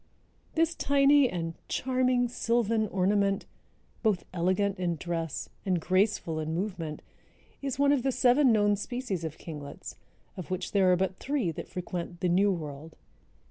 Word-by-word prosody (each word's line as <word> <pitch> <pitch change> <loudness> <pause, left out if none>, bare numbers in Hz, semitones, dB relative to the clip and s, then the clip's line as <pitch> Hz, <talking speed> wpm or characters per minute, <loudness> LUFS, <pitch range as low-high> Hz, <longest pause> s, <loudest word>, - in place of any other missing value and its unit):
This 330 +1 +2
tiny 280 -3 +4
and 165 -2 -3
"charming 255 -1 +1
sylvan 230 -2 +1
ornament," 195 +1 +1 0.6
both 210 -6 +1
elegant 185 +3 +1
in 175 -2 0
dress 165 -2 -3 0.2
and 185 -3 +1
graceful 185 -2 +1
in 155 +1 -2
movement, 175 -5 -4 0.6
is 275 -3 -3
one 280 0 +4
of 285 -3 +3
the 270 - +1
seven 255 +1 +4
known 205 -2 +3
species 210 -4 -4
of 160 -1 -5
kinglets, 145 -3 -8 0.4
of 185 - -7
which 185 -1 -3
there 190 -2 +4
are - - +5
but 190 0 -1
three 270 - -1
that - - -7
frequent 175 -1 -5
the 180 - +1
New 195 +4 +4
World. 155 -2 -6
195 Hz, 150 wpm, -29 LUFS, 175-245 Hz, 0.6 s, are